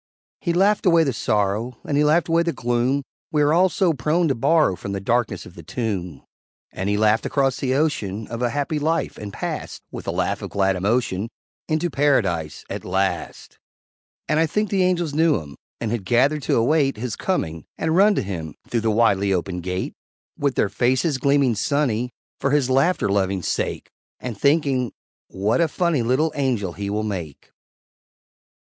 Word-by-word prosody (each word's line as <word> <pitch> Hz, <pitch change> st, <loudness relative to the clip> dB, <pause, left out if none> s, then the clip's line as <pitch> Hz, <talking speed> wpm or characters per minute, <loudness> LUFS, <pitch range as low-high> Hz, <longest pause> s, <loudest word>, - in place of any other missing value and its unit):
He 175 Hz, -, -1 dB
laughed 195 Hz, +3 st, +3 dB
away 170 Hz, -2 st, +6 dB
the 135 Hz, -4 st, 0 dB
sorrow, 105 Hz, +3 st, 0 dB
And 145 Hz, -, -1 dB
he 145 Hz, -, +4 dB
laughed 155 Hz, +3 st, +3 dB
away 165 Hz, 0 st, +3 dB
the 170 Hz, 0 st, 0 dB
gloom 120 Hz, +4 st, 0 dB, 0.3 s
We 150 Hz, -1 st, +3 dB
are 145 Hz, +1 st, +3 dB
all 185 Hz, +3 st, +5 dB
so 180 Hz, -3 st, +2 dB
prone 155 Hz, +6 st, +1 dB
to -, -, +3 dB
borrow 140 Hz, -, +3 dB
From 100 Hz, +2 st, -6 dB
the 100 Hz, -, -2 dB
darkness 110 Hz, -1 st, 0 dB
of -, -, -12 dB
the 85 Hz, -, -11 dB
tomb; 90 Hz, -, -4 dB, 0.5 s
And 95 Hz, +2 st, -3 dB
he 105 Hz, -, +1 dB
laughed 110 Hz, +1 st, +3 dB
across 135 Hz, -2 st, +1 dB
the 130 Hz, -1 st, 0 dB
ocean 110 Hz, -9 st, -1 dB
Of 115 Hz, 0 st, -5 dB
a 120 Hz, -, +2 dB
happy 145 Hz, +3 st, -1 dB
life, 160 Hz, +3 st, -1 dB
and 105 Hz, -1 st, -6 dB
passed, -, -, -5 dB
With -, -, -8 dB
a -, -, +1 dB
laugh -, -, -1 dB
of -, -, -5 dB
glad 95 Hz, -1 st, +1 dB
emotion, 105 Hz, +1 st, 0 dB, 0.4 s
Into 160 Hz, +2 st, 0 dB
Paradise 95 Hz, -, +1 dB
at -, -, -5 dB
last. 95 Hz, +1 st, -2 dB, 0.7 s
And 155 Hz, 0 st, +2 dB
I 165 Hz, -, +3 dB
think 210 Hz, +4 st, -1 dB
the 195 Hz, -2 st, +2 dB
Angels 175 Hz, -4 st, +1 dB
knew 160 Hz, -4 st, +3 dB
him, 70 Hz, -3 st, -11 dB, 0.2 s
And 115 Hz, -2 st, -2 dB
had 115 Hz, -4 st, -2 dB
gathered 130 Hz, +9 st, +2 dB
to -, -, +4 dB
await 135 Hz, +2 st, +2 dB
His 115 Hz, -1 st, -3 dB
coming, 80 Hz, -, -2 dB
and 160 Hz, 0 st, 0 dB
run 205 Hz, +3 st, +5 dB
to -, -, 0 dB
him 85 Hz, -6 st, -5 dB
Through 115 Hz, -, 0 dB
the 110 Hz, -, +1 dB
widely 105 Hz, -3 st, +3 dB
opened 90 Hz, 0 st, -1 dB
Gate 90 Hz, +1 st, -3 dB, 0.4 s
With 140 Hz, -2 st, 0 dB
their 100 Hz, -, +2 dB
faces 130 Hz, -, +1 dB
gleaming 140 Hz, -3 st, +3 dB
sunny 125 Hz, 0 st, 0 dB, 0.3 s
For 140 Hz, -, 0 dB
his 140 Hz, -3 st, +2 dB
laughter 135 Hz, -, +2 dB
loving 95 Hz, -2 st, 0 dB
sake, -, -, -2 dB, 0.3 s
And 125 Hz, -3 st, -5 dB
thinking, 140 Hz, -2 st, +1 dB, 0.3 s
"What 105 Hz, -, 0 dB
a 165 Hz, -, +4 dB
funny 170 Hz, -3 st, 0 dB
Little 130 Hz, +7 st, +1 dB
Angel 120 Hz, -, -1 dB
he 100 Hz, +1 st, -4 dB
will 105 Hz, +1 st, -1 dB
make!" 90 Hz, -9 st, -6 dB
125 Hz, 185 wpm, -22 LUFS, 100-150 Hz, 0.7 s, away